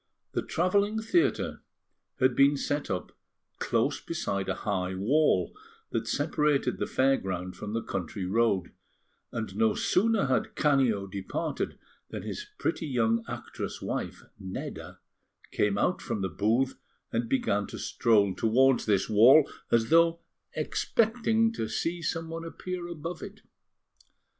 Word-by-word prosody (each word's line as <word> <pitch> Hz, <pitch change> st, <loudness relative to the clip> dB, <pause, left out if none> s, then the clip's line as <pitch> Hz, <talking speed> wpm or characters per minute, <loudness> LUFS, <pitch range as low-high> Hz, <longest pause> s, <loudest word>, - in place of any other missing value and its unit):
The -, -, -1 dB
travelling 200 Hz, +5 st, +1 dB
theatre 340 Hz, +11 st, +1 dB, 0.6 s
had 130 Hz, -1 st, +3 dB
been 140 Hz, +1 st, +5 dB
set 145 Hz, +1 st, -2 dB
up 90 Hz, -, -3 dB, 0.5 s
close -, -, 0 dB
beside 100 Hz, -1 st, -2 dB
a 95 Hz, -, 0 dB
high 95 Hz, -2 st, -1 dB
wall 140 Hz, +12 st, +2 dB, 0.4 s
that -, -, -2 dB
separated 150 Hz, -2 st, +1 dB
the -, -, -1 dB
fair 135 Hz, +1 st, +3 dB
ground 90 Hz, -1 st, -4 dB
from 105 Hz, 0 st, -6 dB
the 115 Hz, -, -1 dB
country 95 Hz, +1 st, -4 dB
road; 100 Hz, -1 st, +1 dB, 0.6 s
and 110 Hz, -4 st, -4 dB
no 110 Hz, 0 st, +2 dB
sooner 220 Hz, 0 st, +2 dB
had 135 Hz, -, 0 dB
Canio 130 Hz, -9 st, +2 dB
departed, 100 Hz, -, -4 dB, 0.3 s
than -, -, -6 dB
his 420 Hz, -, -5 dB
pretty 165 Hz, -1 st, -2 dB
young 115 Hz, -3 st, +1 dB
actress -, -, -6 dB
wife, -, -, -4 dB, 0.2 s
Nedda, 95 Hz, -2 st, -7 dB, 0.5 s
came 105 Hz, -1 st, +1 dB
out 180 Hz, -, +1 dB
from 105 Hz, -, -3 dB
the 95 Hz, -, -1 dB
booth, 115 Hz, +10 st, 0 dB, 0.3 s
and 115 Hz, 0 st, -1 dB
began 105 Hz, -6 st, +1 dB
to -, -, -8 dB
stroll 105 Hz, -4 st, +2 dB
towards 125 Hz, +6 st, +3 dB
this 100 Hz, -2 st, +2 dB
wall, 125 Hz, +8 st, +7 dB, 0.2 s
as 115 Hz, +3 st, +2 dB
though 165 Hz, 0 st, +5 dB, 0.3 s
expecting 225 Hz, 0 st, +1 dB
to 110 Hz, -, -3 dB
see 165 Hz, +9 st, -2 dB
someone 165 Hz, 0 st, -3 dB
appear 175 Hz, +1 st, -5 dB
above 170 Hz, +1 st, -6 dB
it. -, -, -9 dB
130 Hz, 135 wpm, -28 LUFS, 100-165 Hz, 0.6 s, wall